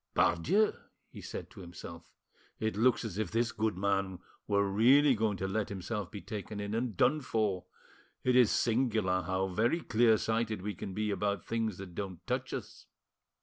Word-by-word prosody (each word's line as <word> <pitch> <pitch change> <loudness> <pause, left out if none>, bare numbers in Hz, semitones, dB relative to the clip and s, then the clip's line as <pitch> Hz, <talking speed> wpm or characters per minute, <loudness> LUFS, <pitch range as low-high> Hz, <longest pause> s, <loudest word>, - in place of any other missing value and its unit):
"Pardieu!" 185 - +3 0.4
he - - -10
said - - -7
to - - -13
himself, 85 -1 -10 0.5
"it 110 -1 -1
looks 120 +2 +3
as 105 -2 -4
if 110 -5 -1
this 115 +3 +1
good 110 -4 -1
man 100 -1 0 0.3
were 100 -1 +2
really 130 +8 +5
going 110 -3 0
to 95 - -2
let 105 +2 -1
himself 100 0 -4
be 100 - -7
taken 105 0 -6
in 100 +1 -3
and 115 -3 -2
done 150 +4 +3
for. 110 -7 -1 0.6
It 125 -1 +3
is 125 -4 +6
singular 110 -6 +1
how 95 +1 -1
very 115 - +1
clear 115 -4 +4
sighted 110 -3 -1
we 105 0 -2
can 95 +1 -7
be 105 0 0
about 100 -2 -1
things 110 -4 -1
that 95 -2 -9
don't 95 -2 -6
touch - - -2
us. - - -7
105 Hz, 180 wpm, -32 LUFS, 95-115 Hz, 0.6 s, is